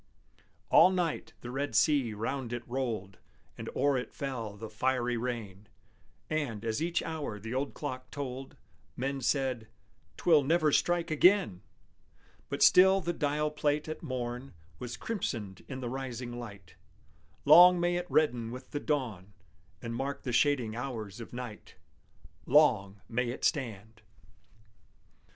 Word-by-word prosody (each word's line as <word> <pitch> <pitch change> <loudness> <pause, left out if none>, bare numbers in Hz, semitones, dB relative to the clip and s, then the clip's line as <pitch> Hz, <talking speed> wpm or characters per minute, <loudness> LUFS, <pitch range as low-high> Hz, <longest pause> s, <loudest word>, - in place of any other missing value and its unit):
All 180 - +8
night 180 -4 -2
the 120 - -7
red 140 +3 -3
sea 135 -8 +3
round 120 +3 -3
it 120 0 -5
rolled, 115 -7 -3 0.4
And - - -7
o'er 140 0 +2
it 125 - -8
fell 115 -7 -4
the 110 +2 -7
fiery 125 +2 0
rain: 115 -4 -5 0.6
And, 125 -9 -2
as 110 +3 -1
each 170 +1 0
hour 150 -10 -4
the 110 +4 -6
old 135 +2 -2
clock 130 -3 -5
told, 135 -2 -6 0.4
Men 135 +2 -2
said, 130 -3 0 0.5
"'Twill 160 -4 +5
never 155 +1 +3
strike 175 +2 +1
again!" 165 - +4 0.9
But - - +1
still 190 +1 +7
the 175 -1 -2
dial 150 0 0
plate 150 0 0
at 155 - -5
morn 125 - -5 0.2
Was 120 -2 -6
crimsoned 115 - -4
in 130 -1 -6
the 125 - -3
rising 125 -2 -5
light. 100 -5 -10 0.7
Long 175 +4 +9
may 175 0 +1
it 175 0 -3
redden 125 -7 +2
with 125 +2 -9
the 145 - -2
dawn, 115 - -2 0.5
And 115 -1 -4
mark 135 +3 -3
the 125 - -3
shading 125 -3 +2
hours 115 -4 -5
of 115 - -9
night! 120 -3 -8 0.7
Long 110 -9 +4
may 120 +1 -1
it 125 - -3
stand! 110 - -2
130 Hz, 140 wpm, -30 LUFS, 115-150 Hz, 0.9 s, Long